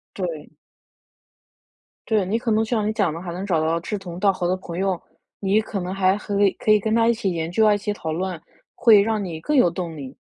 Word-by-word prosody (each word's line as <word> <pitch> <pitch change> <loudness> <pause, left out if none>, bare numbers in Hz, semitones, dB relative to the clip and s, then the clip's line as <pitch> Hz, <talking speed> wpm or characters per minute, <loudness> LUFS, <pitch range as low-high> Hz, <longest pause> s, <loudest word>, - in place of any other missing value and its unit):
对。 170 -6 -5 1.6
对， 215 -4 +2
你 215 +5 0
可 235 0 -2
能 220 0 +2
就 - - -10
像 215 -4 +1
你 215 - 0
讲 200 -7 +1
的， 165 - -6
还 175 -1 -6
能 180 +3 -5
找 165 -5 +1
到 160 +1 +1
志 190 +5 -4
同 175 -3 -8
道 200 +1 +3
合 180 -2 -3
的 185 - +1
朋 175 -2 -7
友， 190 -2 0 0.4
你 200 +2 +2
可 210 -2 -4
能 180 +1 -4
还 190 0 +2
可以- 205 -1 +1
可 - - -2
以 215 -1 +6
跟 220 +2 0
他 230 0 +3
一 235 - +4
起 210 -5 -2
研 165 -1 -3
究 220 +5 +2
啊 210 - +5
一 - - -1
起 205 +1 -2
讨 160 -6 -5
论， 180 0 -3 0.3
会 220 -4 +6
让 215 0 0
你 165 -3 -6
更 300 - 0
有 250 -10 +5
动 170 -2 -5
力。 135 -2 -8
195 Hz, 275 characters per minute, -23 LUFS, 175-215 Hz, 1.6 s, 以